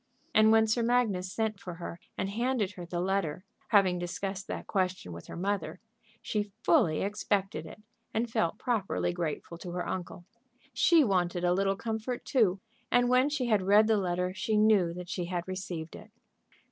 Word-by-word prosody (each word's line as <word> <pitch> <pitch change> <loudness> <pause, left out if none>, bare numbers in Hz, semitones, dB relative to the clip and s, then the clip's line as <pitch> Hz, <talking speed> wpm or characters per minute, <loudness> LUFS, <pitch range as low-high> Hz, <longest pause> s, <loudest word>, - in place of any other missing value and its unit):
And 215 0 +6
when 220 0 +6
Sir 220 +2 +1
Magnus 225 -6 +1
sent 220 -1 -2
for 180 -3 -7
her 170 0 -7 0.2
and 190 - -1
handed 235 0 0
to 205 - -16
her 175 - -6
the 175 0 -3
letter, 185 -3 -1 0.2
having 190 -4 +4
discussed 190 +2 -4
that - - -5
question 185 - -1
with 85 - -10
her - - -8
mother, 195 +1 -2 0.4
she 205 -1 -2
fully 225 - +3
expected 200 0 -1
it, 210 - -12 0.3
and 230 +2 0
felt 170 -7 0
properly 215 -7 -1
grateful 170 0 -4
to 180 - -7
her 180 0 -3
uncle. 180 -1 -5 0.5
She 335 -3 +5
wanted 180 -5 0
a 175 0 +3
little 195 +1 +1
comfort, 225 +3 -4
too, 210 -8 +2 0.3
and 245 0 +4
when 255 +3 +4
she 290 -4 -1
had 215 -4 +3
read 205 +3 +5
the 220 0 +3
letter 180 -1 -1
she 210 +2 0
knew 210 -5 +4
that 180 0 -7
she 175 0 -3
had 175 0 -3
received 180 -4 -5
it. - - -12
195 Hz, 185 wpm, -30 LUFS, 180-220 Hz, 0.5 s, And